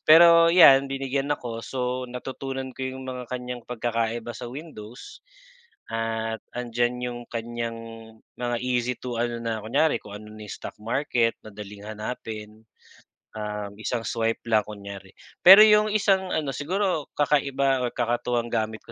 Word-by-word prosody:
pero 170 +1 +8
'yan 140 -6 +7
binigyan 135 0 -2
ako 120 -4 -6
so, 125 0 -2
natutunan 130 +1 -5
ko 130 +1 -5
'yong 130 0 -6
mga 130 -1 -6
kanyang 125 -1 -6
pagkakaiba 115 -1 -2
sa 120 +1 -7
Windows 125 - -10 0.7
at 115 0 -2 0.2
nandyan 120 0 -1
'yong 120 -1 -4
kanyang 115 0 -4 0.6
mga 120 -1 -1
easy 125 0 0
to 125 -2 -5
ano 120 0 -1
na 115 -2 -2
kunyari, 145 +8 +2
kung 105 -1 -10
ano 105 +1 -11
na 110 - -12
'yung 105 - -12
stock - - -8
market 115 0 0
madaling 105 -1 -10
hanapin, 110 0 -7 0.7
um, 105 -1 -4
isang 120 +2 -2
swipe 115 -1 -1
lang 110 -2 +3
kunyari. 100 -2 -9 0.3
Pero 190 +3 +11
'yong 210 0 +5
isang 195 -3 +2
ano 150 -3 -1
siguro 180 0 -1
kakaiba 140 -2 +2
o 120 - -1
kakatuwang 120 0 -1
gamit 110 0 -1
ko - - -12
120 Hz, 145 wpm, -25 LUFS, 115-135 Hz, 0.7 s, Pero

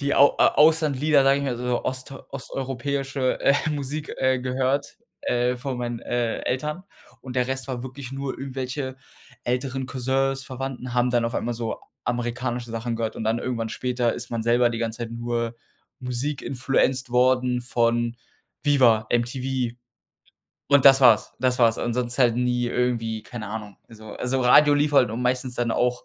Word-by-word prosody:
die 140 0 0
Au 140 +1 +5
Auslandlieder, 150 -2 +4
sage 135 +1 +4
ich 140 - -3
mal, 130 -3 -1
so 125 0 -2
ost 130 +1 -4 0.2
osteuropäische, 135 0 -2
äh, 140 - +4 0.2
Musik, 145 +1 -4
äh, 130 0 +2
gehört, 130 +2 -1 0.3
äh, 125 +1 +1
von 125 0 -4
meinen, 120 -1 -3
äh, 120 -2 -1
Eltern 150 +8 -2 0.4
und 130 -1 -8
der 125 -1 +2
Rest 130 0 -4
war 125 -2 -4
wirklich 130 0 -8
nur 135 0 -4
irgendwelche 130 0 -4 0.5
älteren 130 +1 -2
Cousins, 135 +1 -1
Verwandten 130 -1 -6
haben 125 0 +2
dann 120 -1 +2
auf 115 +1 -2
einmal 120 - -1
so 115 -1 -3 0.3
amerikanische 120 0 -2
Sachen 115 +1 -3
gehört 115 -1 -3
und - - -4
dann 110 +2 +1
irgendwann 115 -2 -3
später 125 -1 0
ist 120 0 -7
man 115 -2 -2
selber 120 +1 +3
die 115 - -4
ganze 115 0 -3
Zeit 115 -1 -5
nur 115 0 -2 0.5
Musik-influencet 130 0 -1
worden 125 0 +3
von 120 -1 +1 0.5
Viva, 125 -7 +4
MTV 125 0 -1 0.9
und 140 -2 +5
das 135 -1 +8
war's, 115 -5 +5
das 125 0 +1
war's. 115 -1 +4
Ansonsten 120 +2 0
halt 120 -2 +3
nie 125 0 +1
irgendwie, 115 -3 -1
keine 115 -4 -7
Ahnung 105 -1 -6
also 110 -1 -12
also, 130 +1 -1
Radio 145 +4 +6
lief 145 +1 +1
halt 130 -5 +5
und 115 +3 -4
meistens 125 0 -1
dann 120 -1 -1
auch, 125 +1 0
125 Hz, 165 wpm, -24 LUFS, 120-135 Hz, 0.9 s, das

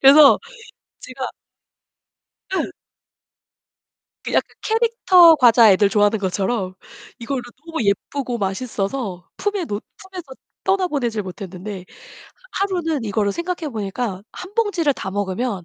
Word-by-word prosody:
그래서 280 +1 +8 0.6
제가 255 0 -6 1.3
예. - - -1 1.5
그 - - -4
약간 - - +2
캐릭터 440 -7 +5
과자 235 -5 +7
애들 200 +1 +4
좋아하는 205 +1 +3
것처럼 190 +1 -1 0.5
이거를 250 +2 -3 0.2
너무 325 -7 -3
예쁘고 245 +5 -1
맛있어서 200 -1 -3
품에 405 -3 -1
놓 205 -6 -4
품에서 380 -2 -9 0.4
떠나보내질 300 - 0
못했는데 190 +1 -7 0.7
하 395 - +1
하루는 325 -9 -1
이거를 205 -1 0
생각해보니까 240 - -3
1 370 +3 -9
봉지를 405 -10 +2
다 195 -7 -6
먹으면 200 +1 -2
245 Hz, 270 characters per minute, -21 LUFS, 200-335 Hz, 1.5 s, 그래서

